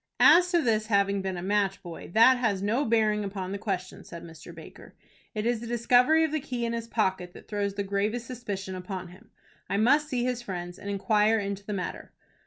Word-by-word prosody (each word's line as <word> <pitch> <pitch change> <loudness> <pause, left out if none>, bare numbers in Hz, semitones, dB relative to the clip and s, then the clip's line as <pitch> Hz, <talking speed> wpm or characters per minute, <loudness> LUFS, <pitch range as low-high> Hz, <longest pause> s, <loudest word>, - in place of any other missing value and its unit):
"As 360 +1 +7
to 345 -3 +2
his 220 -3 +1
having 200 -2 +2
been 190 -1 -3
a 175 - -5
match 200 0 0
boy, 170 -2 -9
that 250 +3 +7
has 205 -5 0
no 235 +8 +1
bearing 215 -2 +2
upon 190 -2 -5
the 200 - -4
question," 185 -3 -4
said 170 -1 -10
Mr. 165 +1 -11
Baker. 165 -1 -13 0.4
"It 215 0 -2
is 240 -1 +1
the 235 - -7
discovery 245 +7 +4
of 320 - 0
the 310 - 0
key 245 -3 -4
in 230 - -2
his 230 -1 -4
pocket 190 -6 -1
that - - -14
throws 200 -2 -2
the 200 - -2
gravest 205 +4 -1
suspicion 205 -6 -5
upon 185 0 -6
him. 180 - -17 0.4
I 200 - 0
must 285 +8 +3
see 250 -4 -1
his 250 -1 -1
friends, 175 -5 -6
and 200 - -7
inquire 210 +2 +2
into 200 -1 -4
the 210 - -5
matter." 185 -2 -5
210 Hz, 215 wpm, -27 LUFS, 190-235 Hz, 0.4 s, As